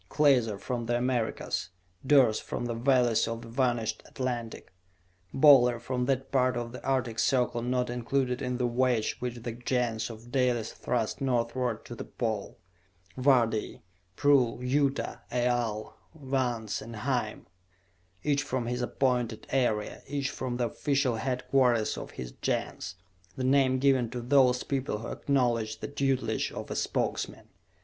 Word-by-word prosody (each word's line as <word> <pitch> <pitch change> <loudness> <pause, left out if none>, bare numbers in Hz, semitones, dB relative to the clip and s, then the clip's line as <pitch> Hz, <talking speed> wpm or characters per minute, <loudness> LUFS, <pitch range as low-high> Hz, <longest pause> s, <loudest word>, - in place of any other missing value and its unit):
Klaser, 125 -8 +3
from 120 +2 -4
the 120 0 +2
Americas; 120 -2 -1 0.3
Durce 130 -6 +5
from - - -4
the 120 - -2
valleys 120 -2 +3
of 115 0 -4
the - - -10
vanished 120 -2 0
Atlantic; 120 -6 -4 0.6
Boler 130 -4 +6
from 125 +1 -2
that 135 0 -1
part 130 -2 +2
of 120 -1 -4
the 125 - -9
Artic 125 -4 0
Circle 125 -2 +2
not 125 +1 0
included 125 +1 -1
in 125 -1 -2
the 125 - 0
wedge 120 -2 +1
which 120 -1 -5
the 120 - -3
Gens 120 -1 -1
of 115 +1 -11
Dalis 125 -4 +1
thrust 115 0 -2
northward 120 -2 -1
to - - -8
the 120 - -6
Pole: 110 -4 -3 0.6
Vardee; 120 -5 +2 0.3
Prull; 135 -3 +3
Yuta; 140 +2 0
Aal; 120 -3 -1 0.2
Vance 130 -6 -2
and 115 +1 -8
Hime. 105 - -2 0.8
Each 145 -1 +2
from 130 -3 -2
his 125 +1 -2
appointed 125 -3 0
area, 115 -5 0
each 140 0 -2
from 125 -3 -3
the 120 - +1
official 135 0 0
headquarters 125 -1 +1
of - - -7
his 65 -1 -5
Gens, 90 - -2 0.4
the 130 - -3
name 130 0 +3
given 130 -3 +3
to 125 +1 -5
those 125 0 +4
people 135 -5 -2
who 115 - -6
acknowledged 120 -5 0
the - - -4
tutelage 135 -5 0
of - - -7
a - - -2
Spokesman. - - -2
125 Hz, 145 wpm, -29 LUFS, 115-130 Hz, 0.8 s, Boler